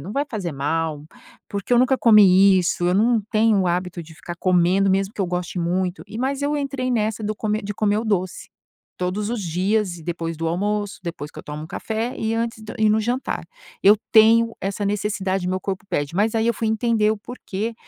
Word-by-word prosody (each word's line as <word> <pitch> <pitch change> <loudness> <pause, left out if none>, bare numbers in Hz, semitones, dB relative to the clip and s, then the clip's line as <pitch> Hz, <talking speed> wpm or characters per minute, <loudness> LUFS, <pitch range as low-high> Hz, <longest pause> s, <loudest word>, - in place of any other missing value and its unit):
"Não 180 +9 -7
vai 280 +4 0
fazer 195 - -4
mal, 150 +2 -2 0.4
porque 200 +3 -4
eu 240 - +6
nunca 255 +2 +3
comi 195 -5 +6
isso, 175 0 0
eu 180 - +2
não 225 +3 +3
tenho 220 -1 +3
o 185 - 0
hábito 175 0 -2
de 160 0 -14
ficar 175 +1 -8
comendo, 185 +2 +3
mesmo 195 +2 0
que - - -5
eu 190 - +1
goste 180 +1 -3
muito", 175 0 -1
e 215 +2 -8
mas 270 +3 -1
eu 290 +1 0
entrei 275 -3 -2
nessa 220 -2 -1
do 215 0 -2
come 215 0 -2
de 205 +1 -4
comer 210 0 +1
o 225 - -3
doce, 185 -4 -2 0.5
todos 185 +3 -2
os 230 -2 -3
dias 185 +2 0
e 160 - -13
depois 165 -1 -4
do 165 +1 -3
almoço, 205 +4 -2
depois 170 -4 -6
que - - -11
eu - - -8
tomo 150 +1 -7
café 225 +7 -3
e 220 0 -2
antes 230 -1 -3
d 215 - -8
e 220 -1 +4
no 215 +1 +3
jantar. 245 +4 -2 0.4
Eu 205 +2 +7 0.2
tenho 230 +1 +5
essa 200 +1 -3
necessidade, 195 -2 -1
meu 185 +1 -1
corpo 190 0 -4
pede, 145 -2 -2
mas 210 +4 +2
aí 225 0 +1
eu 235 - +2
fui 225 +1 -2
entender 220 -1 +2
o 220 - 0
porquê, 225 -1 -5
205 Hz, 220 wpm, -22 LUFS, 180-220 Hz, 0.5 s, Eu